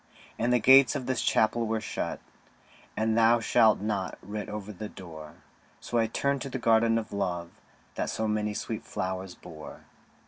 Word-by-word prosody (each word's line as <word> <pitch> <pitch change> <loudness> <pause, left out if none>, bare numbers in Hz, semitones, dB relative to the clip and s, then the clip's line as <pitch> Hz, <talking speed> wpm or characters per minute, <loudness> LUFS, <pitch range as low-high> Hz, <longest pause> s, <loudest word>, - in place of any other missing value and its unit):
And 120 +2 +1
the 125 - +5
gates 130 +3 +6
of 125 - -3
this 130 -1 -1
Chapel 115 +1 +2
were 110 0 0
shut, 110 - -4 0.8
And 110 0 +1
'Thou 115 +1 +5
shalt 110 -2 +4
not' 100 -3 -2
writ 105 +2 -5
over 105 0 -6
the 105 +3 -7
door; 80 -4 -10 0.4
So 120 - -1
I 115 - +2
turned 140 +4 -1
to 135 - -4
the 135 - -3
Garden 115 -1 +3
of 110 -2 -4
Love 90 -4 -2 0.4
That - - -2
so 110 - -2
many 105 -1 -1
sweet - - -4
flowers 95 0 -4
bore. 80 -2 -11
110 Hz, 175 wpm, -28 LUFS, 100-115 Hz, 0.8 s, gates